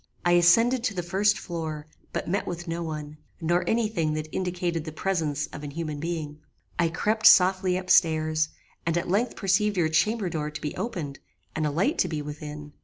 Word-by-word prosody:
I 175 Hz, -, +4 dB
ascended 230 Hz, +9 st, +5 dB
to 210 Hz, -5 st, -1 dB
the 175 Hz, -, -2 dB
first 200 Hz, +4 st, +2 dB
floor, 160 Hz, -4 st, -5 dB, 0.3 s
but -, -, -3 dB
met 195 Hz, +4 st, -1 dB
with 175 Hz, 0 st, -5 dB
no 165 Hz, +1 st, -3 dB
one, 150 Hz, -2 st, -6 dB, 0.2 s
nor 175 Hz, +2 st, +1 dB
any 225 Hz, -1 st, +2 dB
thing 165 Hz, -8 st, -1 dB
that 155 Hz, 0 st, -4 dB
indicated 175 Hz, -3 st, -1 dB
the 155 Hz, -, -6 dB
presence 155 Hz, -4 st, -1 dB
of 150 Hz, -, -7 dB
an 145 Hz, -, -5 dB
human 155 Hz, 0 st, -4 dB
being. 155 Hz, -2 st, -4 dB, 0.4 s
"I 170 Hz, -1 st, +3 dB
crept 215 Hz, +6 st, +2 dB
softly 185 Hz, 0 st, +5 dB
up 185 Hz, 0 st, -3 dB
stairs, 155 Hz, -1 st, +3 dB, 0.3 s
and 165 Hz, 0 st, 0 dB
at 170 Hz, -, -2 dB
length 225 Hz, +6 st, +1 dB
perceived 205 Hz, +1 st, +1 dB
your 165 Hz, -3 st, +2 dB
chamber 200 Hz, +6 st, +1 dB
door 155 Hz, -3 st, -2 dB
to 150 Hz, -, -7 dB
be 150 Hz, -, -4 dB
opened, 175 Hz, -, -4 dB, 0.4 s
and 155 Hz, -1 st, 0 dB
a -, -, 0 dB
light 180 Hz, -, 0 dB
to -, -, +3 dB
be 155 Hz, -3 st, -3 dB
within. 150 Hz, 0 st, -8 dB
170 Hz, 200 wpm, -26 LUFS, 155-185 Hz, 0.4 s, ascended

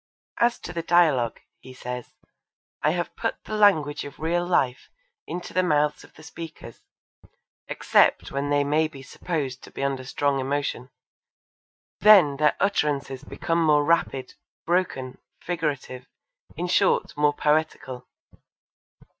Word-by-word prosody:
'As 235 Hz, 0 st, +3 dB
to 175 Hz, -, -7 dB
the 170 Hz, -, -2 dB
dialogue,' 155 Hz, -9 st, +2 dB, 0.2 s
he 130 Hz, 0 st, -13 dB
says, 125 Hz, -1 st, -6 dB, 0.7 s
'I 150 Hz, -, +3 dB
have 175 Hz, -1 st, -3 dB
put 225 Hz, -, -3 dB
the -, -, -8 dB
language 155 Hz, -9 st, +3 dB
of 145 Hz, -, -10 dB
real 170 Hz, +2 st, 0 dB
life 140 Hz, -8 st, 0 dB, 0.4 s
into 175 Hz, +2 st, -6 dB
the 185 Hz, -, +3 dB
mouths 150 Hz, -4 st, +1 dB
of -, -, -19 dB
the 155 Hz, -, -15 dB
speakers, 160 Hz, -7 st, -10 dB, 0.9 s
except -, -, +2 dB
when 140 Hz, +1 st, -2 dB
they 145 Hz, 0 st, +2 dB
may 150 Hz, +2 st, +2 dB
be 140 Hz, -3 st, -12 dB
supposed 140 Hz, -2 st, -4 dB
to -, -, -12 dB
be -, -, -6 dB
under 135 Hz, -1 st, -1 dB
strong 140 Hz, +1 st, 0 dB
emotion; 135 Hz, -2 st, -2 dB, 1.1 s
then 185 Hz, -10 st, +7 dB
their 150 Hz, +1 st, +3 dB
utterances 145 Hz, -9 st, 0 dB
become 165 Hz, 0 st, -2 dB
more 150 Hz, -2 st, +4 dB
rapid 135 Hz, -5 st, 0 dB, 0.3 s
broken 160 Hz, -7 st, -1 dB, 0.2 s
figurative 145 Hz, -7 st, -4 dB, 0.5 s
in 175 Hz, -, -3 dB
short 180 Hz, -1 st, +2 dB
more 145 Hz, 0 st, +2 dB
poetical.' 150 Hz, -5 st, -1 dB
150 Hz, 135 wpm, -25 LUFS, 135-170 Hz, 1.1 s, then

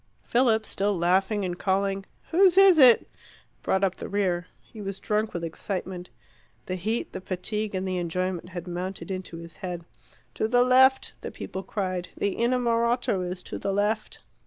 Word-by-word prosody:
Philip, 230 Hz, -3 st, +2 dB
still 200 Hz, -1 st, 0 dB
laughing 190 Hz, +4 st, +2 dB
and 175 Hz, -1 st, -4 dB
calling 195 Hz, 0 st, 0 dB, 0.2 s
"Whose 370 Hz, +1 st, +5 dB
is 385 Hz, -4 st, +7 dB
it?" 250 Hz, -4 st, +7 dB, 0.5 s
brought 190 Hz, +1 st, +1 dB
up 190 Hz, -1 st, +1 dB
the -, -, -6 dB
rear. 180 Hz, -3 st, 0 dB
He 220 Hz, -, -12 dB
was 195 Hz, -1 st, -5 dB
drunk 215 Hz, +1 st, 0 dB
with 170 Hz, -, -5 dB
excitement. 180 Hz, +2 st, -4 dB, 0.6 s
The 185 Hz, -, -3 dB
heat, 215 Hz, +6 st, -2 dB
the -, -, -5 dB
fatigue, 200 Hz, +3 st, -3 dB
and 190 Hz, 0 st, -2 dB
the 185 Hz, -1 st, -1 dB
enjoyment 180 Hz, +1 st, -2 dB
had 175 Hz, -1 st, -7 dB
mounted 185 Hz, +3 st, -5 dB
into 185 Hz, -3 st, -5 dB
his 165 Hz, 0 st, -10 dB
head. 175 Hz, -3 st, -5 dB, 0.5 s
"To 220 Hz, -, 0 dB
the 245 Hz, +2 st, +4 dB
left!" 260 Hz, +1 st, +4 dB
the -, -, -5 dB
people 190 Hz, -, -6 dB
cried. 185 Hz, -3 st, -3 dB
"The 200 Hz, -, -1 dB
innamorato 235 Hz, -3 st, +1 dB
is 180 Hz, 0 st, -4 dB
to -, -, -6 dB
the 200 Hz, -, -1 dB
left." 210 Hz, +2 st, -1 dB
195 Hz, 170 wpm, -26 LUFS, 180-220 Hz, 0.6 s, is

